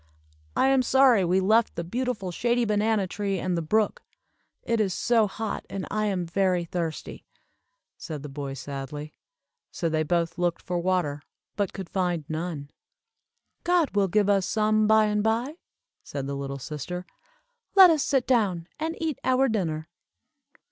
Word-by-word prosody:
"I 265 - +3
am 270 -1 +4
sorry 255 -5 +5
we 180 +2 +2
left 215 +4 +3
the 170 - -3
beautiful 225 0 -3
shady 240 +5 +1
banana 210 -1 +1
tree 195 +1 -2
and 180 0 -1
the 170 - -1
brook. 210 +7 +1 0.6
It 230 -1 +1
is 190 -4 0
so 230 -3 +3
hot, 215 +1 -4
and 195 -2 -4
I 215 0 0
am 185 -3 -1
very 180 0 +1
thirsty," 165 -2 -5 0.7
said 150 -4 -7
the - - -5
boy, 140 -1 -5
sadly. 140 +2 -6 0.6
So 165 - -2
they 155 0 0
both 165 +1 0
looked 175 -1 0
for 180 -1 -2
water, 170 -5 0 0.3
but 200 -3 -1
could 190 -2 -7
find 175 -4 -1
none. 155 -3 -4 0.9
"God 345 -3 +2
will 200 -1 +3
give 205 +2 +2
us 200 -2 +2
some 215 0 +2
by 220 0 +5
and 210 0 +1
by," 235 +8 0 0.5
said 140 -2 -5
the 140 - -3
little 140 0 -4
sister. 155 +6 -6 0.7
"Let 380 -3 +10
us 310 -3 +2
sit 270 -3 +1
down 200 -9 +1
and 325 +2 -3
eat 320 -4 -2
our 260 +1 +3
dinner." 160 -9 -2
190 Hz, 160 wpm, -26 LUFS, 165-225 Hz, 0.9 s, Let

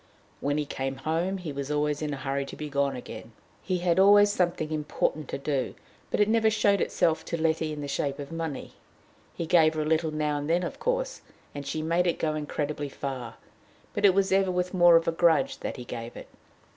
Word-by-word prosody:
When 145 +1 0
he 150 - 0
came 135 -1 -3
home, 165 +7 -1
he 175 -5 -6
was 140 0 -5
always 150 0 0
in 150 -1 -2
a 140 - -3
hurry 135 +1 -2
to - - -8
be 150 -1 -6
gone 140 -1 +1
again. 115 -2 -9 0.3
He 185 -2 -1
had 175 0 +1
always 205 +1 +7
something 175 -5 0
important 150 -1 -1
to - - -3
do, 140 -2 -2 0.3
but - - -1
it 210 - +5
never 220 0 +3
showed 205 -2 +2
itself 160 -1 +1
to 170 - -3
Letty 160 -1 +1
in 150 -1 -5
the 145 - -4
shape 140 0 -2
of 140 +1 -7
money. 165 -4 -5 0.6
He 170 - -3
gave 160 -2 +4
her 155 - 0
a - - -4
little 160 +1 +1
now 150 -1 -1
and 145 +2 -5
then, 175 +2 +2
of - - -5
course, - - -1 0.3
and 145 -1 -6
she 155 +3 -2
made 170 +3 +1
it 170 - +1
go 155 -1 0
incredibly 150 -1 -3
far, 130 -4 -5 0.6
but - - -3
it 195 -2 +6
was 195 0 +2
ever 190 0 +3
with 180 0 -1
more 175 -2 +7
of 165 0 +3
a - - +3
grudge 175 - +2
that - - -5
he 125 - -8
gave 115 -1 -7
it. - - -10
155 Hz, 225 wpm, -27 LUFS, 145-180 Hz, 0.6 s, always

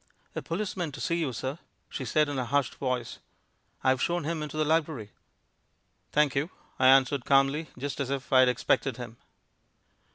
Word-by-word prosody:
"A - - -2
policeman 180 -3 -3
to 145 - -8
see 170 - 0
you, 160 -6 -1
sir," 130 +6 -4 0.3
she 130 - -5
said, 150 +6 +2
in 145 -2 -2
a 125 - -1
hushed 140 +1 0
voice. 130 -3 -3 0.6
"I've 130 -1 +3
shown 175 -1 0
him 160 +1 -2
into 150 0 -5
the 155 - +2
library." 150 -9 0 1.0
"Thank 150 -2 +3
you," 145 +5 0 0.3
I 130 - +5
answered 135 0 +5
calmly, 140 +4 +2
just 140 +2 -4
as 135 -2 -2
if 135 -1 -3
I 130 - +7
had 130 -1 +6
expected 125 +1 0
him. 120 -2 -8
140 Hz, 175 wpm, -28 LUFS, 130-155 Hz, 1.0 s, I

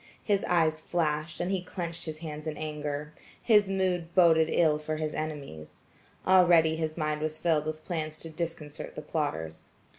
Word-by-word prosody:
His 200 -2 +1
eyes 160 -3 +2
flashed, 155 -1 -1
and 180 +2 -1
he 190 -2 0
clenched 170 -2 -4
his 155 -1 -6
hands 155 -1 -6
in 155 -1 -3
anger. 150 -1 -4 0.3
His 210 -4 +4
mood 180 -3 -1
boded 165 -3 +5
ill 155 -3 +3
for 155 +1 -3
his 155 -1 -3
enemies. 145 - -6 0.4
Already 170 -4 +6
his 160 0 -3
mind 155 -1 -1
was 155 0 -2
filled 155 -2 +1
with 155 0 -5
plans 155 -3 -3
to 165 +1 -7
disconcert 160 -2 -5
the 150 - -6
plotters. 145 - -3
155 Hz, 170 wpm, -29 LUFS, 150-170 Hz, 0.4 s, Already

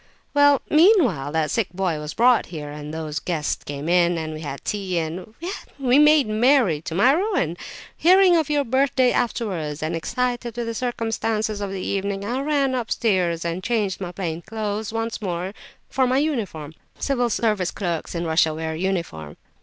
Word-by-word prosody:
"Well, 285 -1 +5
meanwhile 305 - +4
that 160 -1 0
sick 230 -5 +1
boy 180 -5 -1
was 150 0 -6
brought 245 0 +4
here, 150 -4 -7
and 150 0 -7
those 155 -2 -4
guests 160 -3 -2
came 145 +1 -6
in, 175 0 +3
and 160 -1 -4
we 155 - -7
had 140 -3 -7
tea, 195 -4 -2
and—well, 170 +6 -4 0.4
we 265 0 +3
made 300 -3 +6
merry—to 215 - +2
my 240 +8 +5
ruin! 350 - 0 0.4
Hearing 370 +1 +5
of 320 -3 +1
your 295 -1 +2
birthday 260 0 +2
afterwards, 180 -11 -2
and 160 +2 -1
excited 240 +6 -2
with 240 - -2
the 230 - -3
circumstances 225 -3 -2
of 200 - -2
the 190 -1 -5
evening, 200 0 -2
I 245 +5 -2
ran 280 -2 +1
upstairs 190 -8 0
and 170 +2 -3
changed 205 -5 -1
my 180 -2 -4
plain 170 -3 -4
clothes 215 +1 -4
once 225 0 -3
more 180 -1 -3 0.3
for 260 -1 +1
my 255 +1 +2
uniform 210 - -2 0.2
[Civil 245 -3 0
Service 210 -5 0
clerks 175 -3 -4
in 170 0 -2
Russia 160 -1 +2
wear 160 0 -3
uniform. 165 - -3
200 Hz, 170 wpm, -23 LUFS, 165-250 Hz, 0.4 s, made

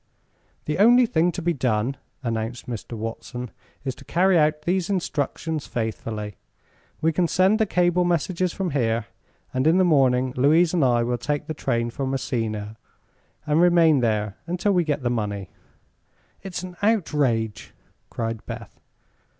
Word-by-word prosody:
"The 150 +4 -2
only 240 +4 +7
thing 175 -4 +2
to 175 - -5
be 175 0 +1
done," 125 -2 0 0.3
announced 115 +1 -3
Mr. 120 -1 -6
Watson, 115 +2 -6 0.3
"is 130 - -1
to 135 - -15
carry 185 +5 +2
out 150 -1 +2
these 180 +2 0
instructions 160 -4 -2
faithfully. 110 -2 -4 0.6
We 160 +1 +2
can 175 +2 +2
send 190 +6 +3
the 220 - +2
cable 180 -1 +2
messages 175 +1 0
from 185 -2 -3
here, 115 -5 0 0.5
and 130 +3 +1
in 165 +3 +5
the 190 - +5
morning 130 -6 +3
Louise 160 +6 +4
and 170 -5 +2
I 120 -2 +3
will 120 0 -1
take 145 +5 -2
the 155 - -4
train 120 -5 -1
for 135 +1 -3
Messina 110 -5 -3 0.7
and 150 +2 +3
remain 170 -4 +5
there 105 -4 0
until 180 +4 0
we 180 -3 +3
get 150 -3 -2
the 120 - +1
money." 100 -5 -3 0.9
"It's 185 -2 -5
an 180 -1 -8
outrage!" 145 - 0 0.3
cried 115 -1 -4
Beth. - - -8
145 Hz, 155 wpm, -24 LUFS, 115-175 Hz, 0.9 s, only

